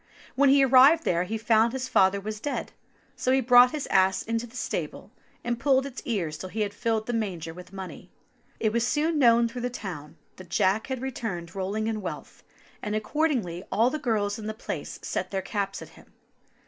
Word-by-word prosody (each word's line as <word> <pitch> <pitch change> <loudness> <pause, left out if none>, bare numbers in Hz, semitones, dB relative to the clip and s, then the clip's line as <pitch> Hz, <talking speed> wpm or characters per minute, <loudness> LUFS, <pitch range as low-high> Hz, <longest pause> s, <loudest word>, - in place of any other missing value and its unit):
When 280 +1 +4
he 275 0 +6
arrived 270 +6 +6
there 175 +1 +1
he 220 +4 -3
found 225 +1 +3
his 260 -1 -3
father 190 -4 +3
was 215 +2 -5
dead, 285 - -4 0.4
so 255 - 0
he 265 - +4
brought 250 0 +7
his 300 +1 -4
ass 190 0 +3
into 230 +1 -2
the 235 - -17
stable, - - -4 0.3
and 240 0 -2
pulled 265 0 +3
its 270 -2 -7
ears 170 -10 -2
till 185 - -6
he 220 +3 -3
had 205 -1 -1
filled 220 0 -1
the 240 - -3
manger 180 -8 -3
with 180 +1 -12
money. 190 -1 -9 0.5
It 220 -1 0
was 235 0 +1
soon 310 +3 +1
known 235 -2 +5
through 245 +1 -7
the 245 - -1
town 175 -11 -8 0.2
that 185 -2 -12
Jack 195 +6 +1
had 260 -1 -4
returned 195 -10 -5
rolling 200 +3 -2
in 220 -1 -2
wealth, 185 - -7 0.4
and 210 0 -3
accordingly 215 - -1
all 225 +6 +3
the 305 - -3
girls 215 -6 -1
in 215 - -6
the 215 - -4
place - - -6
set - - -3
their 190 -1 -3
caps 200 -2 -3
at - - -13
him. - - -19
220 Hz, 205 wpm, -26 LUFS, 195-250 Hz, 0.5 s, brought